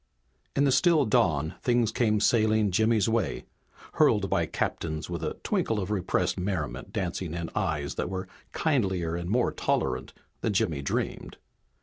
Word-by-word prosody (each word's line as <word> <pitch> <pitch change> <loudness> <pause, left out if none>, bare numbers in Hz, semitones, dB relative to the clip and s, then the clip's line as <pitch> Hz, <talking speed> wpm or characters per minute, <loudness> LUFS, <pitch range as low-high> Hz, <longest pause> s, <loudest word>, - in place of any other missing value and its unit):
In 140 - +3
the 140 - +4
still 160 0 +4
dawn 80 - +2
things 120 -3 +2
came 110 -2 +2
sailing 110 -2 +3
Jimmy's 110 +1 +3
way, 115 0 -1 0.5
hurled - - +4
by - - +2
captains 80 -1 -3
with - - -4
a - - -2
twinkle 110 - 0
of 95 +1 -3
repressed 95 -2 0
merriment 80 -6 -3
dancing 90 -5 -3
in 85 -1 -4
eyes 80 -8 -1
that - - -3
were 95 0 -4 0.2
kindlier 95 - 0
and 85 0 -4
more 120 +4 +2
tolerant - - -1 0.3
than 110 - -1
Jimmy 80 -6 0
dreamed. 70 - -3
100 Hz, 150 wpm, -28 LUFS, 85-115 Hz, 0.5 s, the